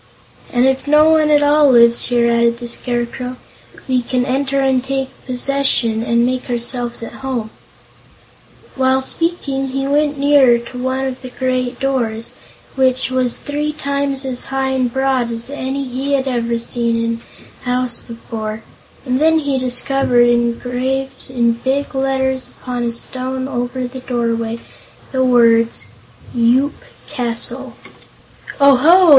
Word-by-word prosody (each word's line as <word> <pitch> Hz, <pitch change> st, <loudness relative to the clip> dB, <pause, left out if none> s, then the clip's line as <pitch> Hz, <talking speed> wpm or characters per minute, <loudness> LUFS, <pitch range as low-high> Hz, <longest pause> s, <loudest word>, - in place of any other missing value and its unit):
"And 245 Hz, 0 st, +3 dB
if 265 Hz, +1 st, +1 dB
no 305 Hz, +2 st, +5 dB
one 310 Hz, -1 st, +3 dB
at 295 Hz, -1 st, +4 dB
all 290 Hz, 0 st, +5 dB
lives 235 Hz, 0 st, +5 dB
here," 240 Hz, -1 st, +2 dB
added 235 Hz, 0 st, +2 dB
the 240 Hz, 0 st, -7 dB
Scarecrow, 245 Hz, +1 st, -2 dB, 0.5 s
"we 255 Hz, -1 st, +2 dB
can 250 Hz, +1 st, -1 dB
enter, 275 Hz, +1 st, 0 dB
and 265 Hz, -2 st, +2 dB
take 270 Hz, 0 st, -2 dB, 0.2 s
possession, 255 Hz, -3 st, +1 dB
and 235 Hz, +1 st, +2 dB
make 255 Hz, +1 st, -2 dB
ourselves 240 Hz, 0 st, -2 dB
at -, -, -7 dB
home." 245 Hz, -5 st, -3 dB, 1.2 s
While 260 Hz, 0 st, +2 dB
speaking 280 Hz, -4 st, -1 dB
he 270 Hz, +1 st, -2 dB
went 295 Hz, +1 st, +1 dB
nearer 275 Hz, -4 st, +5 dB
to 235 Hz, +1 st, -9 dB
one 260 Hz, +1 st, -1 dB
of 260 Hz, -1 st, -4 dB
the 255 Hz, -, -7 dB
great 255 Hz, -1 st, -2 dB
doors, 235 Hz, -5 st, -2 dB, 0.4 s
which 260 Hz, -1 st, +1 dB
was 255 Hz, -2 st, 0 dB
three 295 Hz, +1 st, -3 dB
times 280 Hz, -2 st, -2 dB
as 255 Hz, -2 st, -3 dB
high 270 Hz, 0 st, -1 dB
and 255 Hz, -2 st, 0 dB
broad 265 Hz, -2 st, 0 dB
as 230 Hz, +3 st, -5 dB
any 275 Hz, 0 st, -3 dB
he 265 Hz, +3 st, -2 dB
had 270 Hz, -1 st, +1 dB
ever 235 Hz, -2 st, -1 dB
seen 235 Hz, 0 st, -1 dB
in 230 Hz, 0 st, -2 dB, 0.4 s
a -, -, -18 dB
house 250 Hz, -1 st, 0 dB
before, 220 Hz, -2 st, -7 dB, 0.4 s
and 255 Hz, 0 st, 0 dB
then 320 Hz, +1 st, +5 dB
he 285 Hz, -4 st, 0 dB
discovered, 250 Hz, -1 st, +2 dB
engraved 250 Hz, +3 st, -1 dB
in 240 Hz, -2 st, +2 dB
big 275 Hz, +2 st, -1 dB
letters 265 Hz, -1 st, 0 dB
upon 245 Hz, -1 st, -5 dB
a -, -, 0 dB
stone 260 Hz, +2 st, -3 dB
over 250 Hz, -1 st, -3 dB
the 255 Hz, +1 st, -7 dB
doorway, 230 Hz, -2 st, -2 dB, 0.5 s
the 260 Hz, -1 st, +1 dB
words: 230 Hz, -2 st, +3 dB, 0.5 s
"YOOP 245 Hz, +4 st, +3 dB, 0.3 s
CASTLE" 245 Hz, -1 st, -2 dB, 0.9 s
"Oho!" 300 Hz, +7 st, +6 dB
255 Hz, 145 wpm, -17 LUFS, 240-270 Hz, 1.2 s, Oho